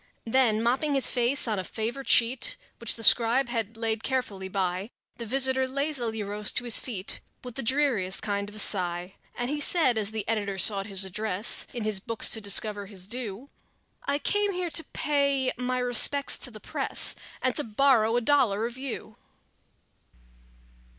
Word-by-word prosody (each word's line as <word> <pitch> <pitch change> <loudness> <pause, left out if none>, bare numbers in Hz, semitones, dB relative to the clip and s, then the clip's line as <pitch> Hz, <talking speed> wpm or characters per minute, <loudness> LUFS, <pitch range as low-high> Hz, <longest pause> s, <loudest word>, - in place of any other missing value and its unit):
Then, 225 -2 +1
mopping 270 +5 0
his 270 - +3
face 250 +2 +1
on 215 -3 -1
a - - -4
favorite 235 +7 -6
sheet 255 - +2 0.2
Which 235 - +1
the 225 - -4
scribe 240 +3 +4
had 225 -2 -4
laid 225 -1 -2
carefully 225 -8 -3
by, 185 +1 -3 0.3
The 235 - -7
visitor 265 +1 +1
lazily 260 -5 -1
rose 205 +1 -2
to - - -1
his 240 -2 +4
feet 205 -6 -1 0.2
With 250 -1 -8
the 270 - -3
dreariest 240 -7 +1
kind 200 -1 -3
of 210 - -14
a - - -10
sigh, 180 -3 +2 0.2
And 245 - -3
he 295 - -3
said, 285 -6 +3
as 205 -2 +1
the 220 -2 -5
editor 205 -3 -2
sought 195 +1 +4
his 195 -1 +3
address, 205 +2 0
In 240 - -6
his 215 -2 +1
books 230 +3 +2
to 220 - +3
discover 205 0 0
his 190 -3 -9
due: 235 +3 -6 0.5
"I 280 0 -1
came 410 +7 -1
here 355 -2 -4
to 325 - 0
pay 280 -3 -1
my 250 +1 -3
respects 250 +3 +3
to - - +1
the 215 -3 -13
press, - - -1 0.2
And 255 - -1
to 295 - +3
borrow 230 -1 +2
a - - 0
dollar 230 -5 +1
of 240 +2 -7
you!" 255 -5 -7
230 Hz, 175 wpm, -26 LUFS, 210-265 Hz, 0.5 s, scribe